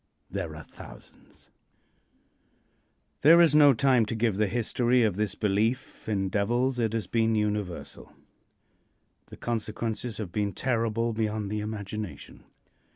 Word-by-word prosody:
There 90 -5 -4
are 75 - -9
thousands. - - -15 1.7
There 165 +4 +7
is 165 -4 +5
no 150 -2 +7
time 125 -2 +3
to 115 - -3
give 110 -3 0
the 105 0 +2
history 120 +2 +1
of 105 -5 +1
this 105 -1 -1
belief 110 +4 -1
in 95 -3 0
devils. 120 +6 0
It 115 -2 0
has 115 -1 -1
been 115 -1 +1
universal. 105 -4 -3 1.2
The - - -12
consequences 115 0 -3
have 105 -6 -5
been 100 0 -1
terrible 115 0 -1
beyond 110 -2 -2
the 105 - -2
imagination. 105 -1 -6
110 Hz, 130 wpm, -27 LUFS, 105-120 Hz, 1.7 s, There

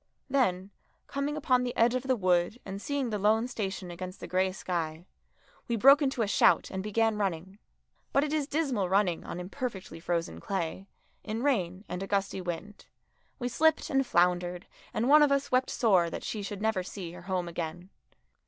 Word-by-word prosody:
Then, 195 -8 +1 0.3
coming 280 +2 -2
upon 255 -4 +2
the 245 -1 -3
edge 235 +1 +4
of 255 - 0
the 260 0 +1
wood 185 +1 +1
and 195 +1 -6
seeing 280 -3 -2
the 210 - -1
lone 220 +4 +3
station 195 -6 -4
against 185 +2 -7
the - - -7
grey 185 +1 +1
sky, 170 -3 -3 0.6
we 235 - 0
broke 275 +7 +7
into 270 -4 +1
a - - -1
shout 200 - +4
and 190 - -3
began 215 +1 +1
running. 190 0 -3 0.5
But 275 - +3
it 300 0 -2
is 300 -3 0
dismal 275 - 0
running 190 -3 +2
on - - -6
imperfectly 190 -1 -5
frozen 165 - -2
clay, 190 - -3 0.4
in 225 +2 -3
rain 195 -8 0
and 180 - -5
a 195 - -4
gusty 195 -1 -1
wind. 180 +4 -6 0.5
We 245 - -3
slipped 320 +7 +2
and 270 -1 +3
floundered, 180 -3 +1 0.3
and 235 - -1
one 300 +2 +7
of 295 -1 +5
us 280 0 +1
wept 255 +1 +2
sore 185 -8 +3
that - - -6
she 215 - -3
should 200 0 -5
never 220 -4 +1
see 180 -2 -7
her 175 0 -10
home 180 -1 -2
again. 170 +2 -5
200 Hz, 190 wpm, -29 LUFS, 180-250 Hz, 0.6 s, broke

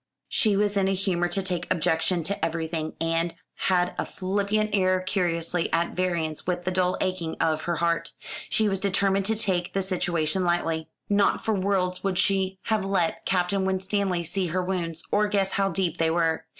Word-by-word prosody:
She 215 -3 +2
was 205 0 +1
in 195 -1 +3
a 195 - +1
humour 185 -2 0
to 190 +3 0
take 180 -2 -3
objection 170 0 +1
to 200 +1 -3
everything, 160 -1 -2
and 165 +1 0 0.2
had 180 -1 +1
a - - +2
flippant 200 +3 -1
air 185 -2 +3
curiously 175 -2 -1
at 170 +1 +1
variance 170 -4 -1
with 180 -1 -1
the 185 - 0
dull 185 0 +1
aching 185 -3 -2
of 155 -1 +1
her 170 0 0
heart. 165 0 0 0.4
She 220 - +2
was 195 -2 0
determined 195 0 +1
to 220 +2 +2
take 185 -5 -1
the 195 - +1
situation 175 -2 0
lightly. 165 -2 0 0.2
Not 200 -1 +2
for 220 - +2
worlds 185 -2 0
would 195 -2 0
she 190 0 +1
have 220 -3 0
let 195 -4 0
Captain 190 +1 +1
Winstanley 190 -1 0
see 185 +2 -2
her 180 +3 -1
wounds, 175 -3 -2
or 210 +1 +3
guess 200 -2 +1
how 195 0 +1
deep 180 -4 -1
they 165 -1 +3
were. 165 -1 +1
185 Hz, 185 wpm, -26 LUFS, 170-195 Hz, 0.4 s, in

